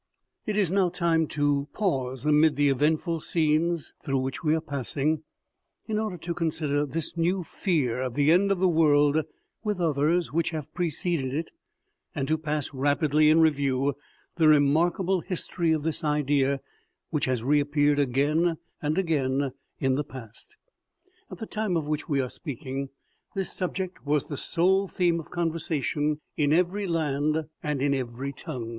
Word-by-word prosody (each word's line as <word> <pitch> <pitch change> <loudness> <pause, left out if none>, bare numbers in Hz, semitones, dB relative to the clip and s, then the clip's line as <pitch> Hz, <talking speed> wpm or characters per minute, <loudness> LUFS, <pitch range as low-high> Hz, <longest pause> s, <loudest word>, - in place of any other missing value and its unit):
IT 210 -1 -1
is 195 -5 +2
now 190 -2 +3
time 165 -2 +1
to 145 -1 0
pause, 130 - -1
amid 150 0 +4
the 145 +1 +3
eventful 155 +5 +1
scenes 160 +1 0
through 135 -1 0
which 130 +5 -3
we 155 0 +3
are - - +1
passing, 145 +1 -2 0.6
in 215 -1 -1
order 215 -4 -3
to 170 +1 -4
consider 150 -3 -1
this 160 +4 -4
new 175 +2 +1
fear 145 - -1
of 125 -2 -3
the 145 +1 +4
end 195 +4 +4
of 195 - +2
the 185 +1 +3
world 150 -2 +4 0.4
with 210 -3 -1
others 160 +1 +1
which 165 0 +1
have 155 -2 -6
preceded 165 -5 -1
it, 160 +2 -3 0.6
and 135 -1 -2
to 155 - +2
pass 150 -2 -3
rapidly 145 +2 +3
in 160 +1 +5
review 140 -3 +2 0.4
the 160 -2 +4
remarkable 165 +6 +3
history 170 -2 -1
of 155 -2 +1
this 160 0 -2
idea, 145 -2 +1 0.5
which 150 -3 0
has 125 -3 -1
reappeared 145 +1 +2
again 150 +5 +2 0.2
and 150 +2 -1
again 140 -6 +1 0.3
in 130 -1 +2
the 145 +3 0
past. 130 - -12 0.7
At - - -8
the 220 - -5
time 215 -5 -1
of 155 - -2
which 150 +2 -3
we 140 -2 +1
are 130 - -3
speaking, 135 -2 -5 0.5
this 195 -1 -2
subject 185 0 -4
was 145 -1 0
the 145 - -3
sole 190 +7 +2
theme 175 -2 +1
of 160 - -9
conversation 155 -3 -1 0.2
in 145 -2 +2
every 185 +4 +1
land 155 -1 0 0.2
and 150 -3 -2
in 140 -1 +2
every 130 +1 -3
tongue. 130 -6 -6
155 Hz, 165 wpm, -27 LUFS, 140-170 Hz, 0.7 s, in